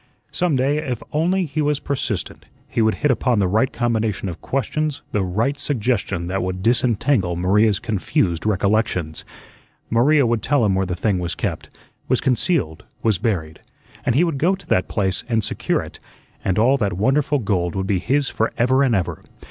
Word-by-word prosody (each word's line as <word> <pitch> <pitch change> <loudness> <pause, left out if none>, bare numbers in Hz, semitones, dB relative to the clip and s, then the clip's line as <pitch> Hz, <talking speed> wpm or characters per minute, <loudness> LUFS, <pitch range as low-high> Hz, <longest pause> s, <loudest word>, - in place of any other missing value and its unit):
Some 175 -5 0
day, 135 +3 +1
if 125 -6 -4
only 180 +5 +1
he 155 0 -2
was 145 -1 +1
persistent, 140 -2 -3 0.2
he - - -1
would 110 -2 +2
hit 145 - +5
upon 125 -1 +1
the 100 -2 +2
right 110 +7 +2
combination 110 -5 -1
of 85 - -8
questions, 145 +2 -2
the 105 - 0
right 110 +9 0
suggestion 115 - -1
that 95 +2 -2
would 95 +1 -3
disentangle 115 -4 +2
Maria's 100 +4 +3
confused 95 -6 -1
recollections. 100 -5 0 0.7
Maria 140 +5 +4
would 115 -1 +1
tell 140 -5 +2
him 100 - +2
where 95 0 0
the 90 - -2
thing 95 +1 0
was 85 -1 -3
kept, - - -4 0.4
was - - +2
concealed, 125 - 0 0.2
was 110 -6 +2
buried, 85 -9 -2 0.4
and 120 - +1
he 155 - +4
would 165 -6 -1
go 180 +6 +3
to 190 - -16
that 90 - +1
place 95 -3 -1
and 115 -2 +1
secure - - -1
it, - - -11 0.4
and 95 - 0
all 125 +6 +4
that 100 -7 -1
wonderful 135 +10 +1
gold 95 -7 -1
would 95 0 -1
be 95 -1 +1
his 135 +8 +1
forever 125 +4 +1
and 135 -4 +3
forever. 95 -4 -2
115 Hz, 180 wpm, -21 LUFS, 95-135 Hz, 0.7 s, hit